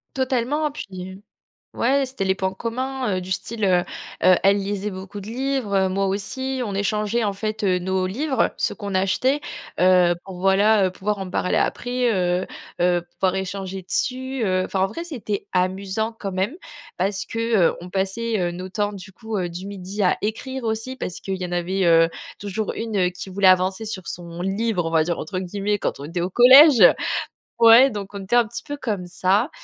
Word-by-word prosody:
Totalement, 265 +4 0
puis, 295 - -7 0.2
heu 190 +2 -12 0.5
ouais, 270 +3 +2
c'était 260 -6 -4
les 190 0 +1
points 190 0 -2
communs, 250 0 -2
heu, - - 0
du 185 +1 -8
style, 220 +3 -2
heu, 180 -2 +4 0.4
heu, 185 0 +7
elles 195 +1 +5
lisaient 200 +1 -3
beaucoup 190 +2 -8
de - - -10
livres, 260 -2 -2
heu, - - -3
moi 195 +1 0
aussi, 255 +7 -3
on 205 -4 -4
échangeait 210 +3 0
en 205 -2 0
fait, 215 +2 -4
heu, 185 -2 +2
nos 185 +1 -1
livres, 260 +6 0
ceux - - -1
qu'on 200 -2 -6
achetait, 195 +9 +1 0.4
heu, 180 -1 +5
pour 190 -2 -9
voilà, 195 +2 +4
heu, 185 - 0
pouvoir 205 +3 -2
en 195 -1 -5
parler 180 - 0
après, 245 0 0
heu, 180 -1 0 0.3
heu, 175 0 +3
pouvoir 190 -1 0
échanger 190 0 -4
dessus, 260 +6 -2
heu. 185 -1 +1
Enfin 190 - -2
en 190 - +3
vrai, 275 +12 -6
c'était 240 -11 -5
amusant 195 +4 -1
quand 195 -2 -4
même, 190 - -1 0.4
parce 195 +3 -1
que, 230 - -5 0.3
heu, - - -5
on 180 - -9
passait, 200 +4 -1
heu, 175 -1 0
nos 180 +2 -7
temps 205 +1 -1
du 190 -1 -10
coup, 220 +3 -7
heu, 180 -3 -1
du 175 +3 -7
midi 200 +1 -4
à 180 - +3
écrire 255 +5 -4
aussi 225 +3 -2
parce 180 -8 -5
qu'il 190 -1 -3
y - - -1
en 180 - -7
avait, 180 +2 0
heu, 165 -1 +6 0.3
toujours 205 +1 -3
une, 225 -1 -4
heu, 180 -2 +3
qui 180 +2 -9
voulait 195 0 +3
avancer 185 +3 +3
sur 190 -4 -6
«son 170 0 -7
livre,» 195 -2 -1
on 165 - -2
va 160 -1 +4
dire 170 +1 -2
entre 185 +4 -4
guillemets 200 +3 -2
quand - - -2
on 140 - -6
était 170 +2 -3
au 180 - -1
collège. 255 - +8 0.7
Ouais, 235 +3 +8
donc 205 -4 -6
on 200 - -6
était 195 +5 -1
un 240 -1 +5
petit 235 +2 -7
peu 290 - -5
comme 215 -10 -3
ça. 195 - +1
200 Hz, 205 wpm, -22 LUFS, 185-230 Hz, 0.7 s, collège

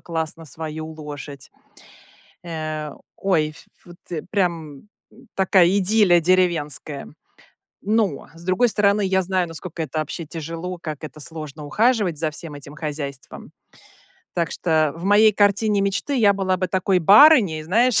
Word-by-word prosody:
классно 165 -1 -4
свою 155 +1 -7
лошадь. 145 -3 -9 0.9
Э, 155 -3 -5 0.2
ой, 170 -6 +1
ф 155 - -15 0.2
вот 175 0 -14 0.3
прям 170 -5 -2 0.2
м, 245 +1 -19
такая 190 -2 +4
идиллия 195 -1 +4
деревенская. 160 -6 0 0.7
Но, 210 -8 0
с 165 +1 -13
другой 185 +7 +2
стороны, 205 -1 +2
я 190 0 +2
знаю, 185 0 0
насколько 165 0 -7
это 155 0 -4
вообще 155 +2 -4
тяжело, 165 +3 -6
как 155 -3 -6
это 155 0 -9
сложно 155 -1 -7
ухаживать 210 - +1
за 155 -1 -1
всем 155 0 -9
этим 145 0 -10
хозяйством. 145 -4 -6 0.8
Так 170 -2 -1
что 155 -3 +1
в 170 - -8
моей 210 +2 +5
картине 205 +1 +2
мечты 200 +8 -1
я 210 -5 +5
была 190 -1 0
бы 185 - -1
такой 190 0 +1
барыней, 200 - +6
знаешь, 230 +8 +3
170 Hz, 140 wpm, -22 LUFS, 155-195 Hz, 0.9 s, барыней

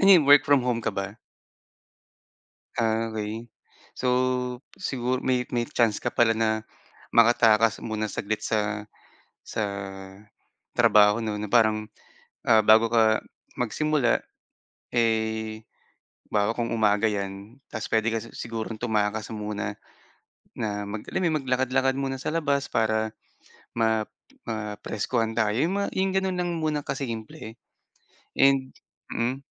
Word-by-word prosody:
Ano 195 - +5
yun, 175 -6 +8
work 145 0 +8
from 140 -3 +4
home 120 -2 0
ka - - -1
ba? 100 +3 -4 1.6
Ah, 115 0 +1
okey. 110 +1 -5 0.5
So 130 - -1 0.7
siguro 130 -7 -1
may 125 -1 +1
may 120 -1 0
chance 115 -3 +1
ka - - -3
pala 115 -1 +3
na 110 -1 +2 0.6
makatakas 115 -2 +4
muna 110 -1 -2
saglit 105 +1 -3
sa 105 -1 -1 0.6
sa 110 - -2 1.1
trabaho 105 +2 +5
'no, 105 -1 -2
na 105 - -3
parang, 110 -1 +3 0.6
ah, 110 -2 +6
bago 110 +2 +5
ka 110 -1 +3 0.3
magsimula 135 +2 +1 0.7
eh, 110 -1 0 0.7
'bawa 105 +1 +1
kong 115 -1 -2
umaga 110 0 +3
'yan, 100 +3 -5
ta's 110 -3 -5
puwede 110 0 +2
ka - - +1
si 115 - -11
sigurong 115 -1 -5
tumakas 110 -1 -1
muna 105 -1 -4 0.8
na 105 -2 -3
mag 105 +1 -5
alam - - -1
mo 185 - 0
'yun, 160 - 0
maglakad-lakad 130 +1 +1
muna 135 -1 -2
sa - - -2
labas 145 -4 0
para 110 -1 +1 0.7
ma 110 -1 +2 0.4
mapreskuhan 110 +1 -2
ka. 110 -3 +2
'Yung 155 - +1
ma 200 - 0
'yung 190 0 +1
gano'n 190 -1 +1
lang 175 0 -1
muna 155 -2 -1
ka 140 -1 -4
simple 115 -4 -6 0.8
and 135 -1 +3 0.4
mm. 125 +4 -1
115 Hz, 130 wpm, -26 LUFS, 110-130 Hz, 1.6 s, yun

